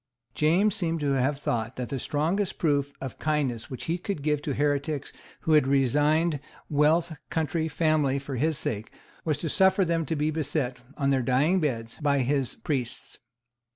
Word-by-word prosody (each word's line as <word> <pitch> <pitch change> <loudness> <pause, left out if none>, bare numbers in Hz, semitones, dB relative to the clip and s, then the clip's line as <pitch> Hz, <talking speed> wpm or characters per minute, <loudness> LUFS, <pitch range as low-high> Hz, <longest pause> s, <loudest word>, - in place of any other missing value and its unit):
James 180 +7 +3
seems 165 -5 0
to 145 -1 +1
have 135 +1 +1
thought 120 -4 -2
that 125 -2 -4
the 135 - -3
strongest 170 - -1
proof 145 -3 +1
of 135 -3 -7
kindness 140 -7 -1
which 130 - -6
he 170 +2 -1
could 175 -5 -4
give 150 -1 +1
to 145 -2 -3
heretics 145 0 -1 0.3
who 160 - -1
had 150 -3 +5
resigned 145 +4 +2 0.3
wealth, 160 +3 +3
country, 160 0 0
family, 155 -3 +2
for 135 0 -5
his 155 +4 +1
sake, 110 -7 -3 0.3
was 155 -3 0
to 165 - -3
suffer 190 +4 +4
them 165 -1 +1
to 160 - -1
be 150 +1 0
beset, 145 -4 -1 0.2
on 140 -1 +1
their 135 -1 +2
dying 135 +9 +3
beds, 115 -8 -2
by 145 -1 +2
his 135 0 0
priests. 135 -8 -4
145 Hz, 175 wpm, -27 LUFS, 135-160 Hz, 0.3 s, had